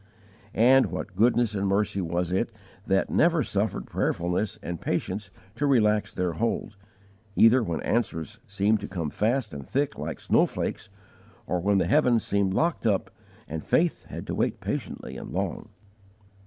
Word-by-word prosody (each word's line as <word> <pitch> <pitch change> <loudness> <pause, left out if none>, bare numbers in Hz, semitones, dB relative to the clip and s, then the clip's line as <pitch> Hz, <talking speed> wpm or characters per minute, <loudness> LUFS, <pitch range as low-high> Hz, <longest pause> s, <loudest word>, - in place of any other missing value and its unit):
And 130 +4 +6
what 95 - -6
goodness 120 +1 +3
and 100 -1 -1
mercy 100 0 +1
was 85 0 -1
it 105 +6 0 0.4
that 95 0 +1
never 165 -2 +3
suffered 100 0 -1
prayerfulness 90 +5 -1
and 85 -1 -5
patience 100 +1 -2 0.2
to 145 +6 -1
relax 105 -6 +3
their 90 -1 -1
hold, 110 +2 -2 0.6
either 120 +3 +6
when 85 -7 -2
answers 110 -2 -1
seemed 100 +1 +2
to 100 - -6
come 85 -5 -3
fast 115 - 0
and 70 -1 -6
thick 140 - -1
like 75 +2 -4
snow - - +3
flakes, - - -4 0.6
or 90 - -1
when 100 +3 +2
the - - +2
heavens 125 -6 +3
seemed 100 -1 +1
locked 165 -7 +1
up 100 -3 0 0.4
and 80 +1 -5
faith 170 0 +1
had - - -7
to - - -4
wait - - 0
patiently 65 - -4
and - - -8
long! - - -3
105 Hz, 160 wpm, -26 LUFS, 90-115 Hz, 0.6 s, And